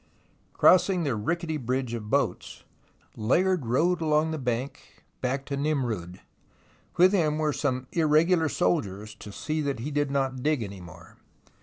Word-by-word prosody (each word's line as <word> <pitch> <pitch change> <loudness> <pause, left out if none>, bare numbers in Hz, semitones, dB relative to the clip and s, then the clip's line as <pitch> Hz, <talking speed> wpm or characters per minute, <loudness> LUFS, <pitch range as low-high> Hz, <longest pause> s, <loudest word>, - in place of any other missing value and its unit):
Crossing 185 -1 +4
the 140 -5 0
rickety 160 - -2
bridge 130 -2 -2
of 110 -3 -5
boats, - - -1 0.5
Layard 170 - +1
rode 165 +9 +2
along 155 0 +2
the 160 - -3
bank 125 +1 -5 0.2
back 135 +2 -2
to 140 - -3
Nimroud. 120 - -2 0.8
With 185 +3 +6
him 155 -6 +2
were 155 -1 0
some 130 -3 -1
irregular 160 +1 +3
soldiers, 105 - -1
to 105 -1 -11
see 155 +9 -3
that 140 -2 -2
he 145 +5 -4
did 145 -1 0
not 135 -2 -1
dig 150 -3 +1
any 100 -2 -8
more. 85 -1 -14
140 Hz, 150 wpm, -27 LUFS, 120-160 Hz, 0.8 s, With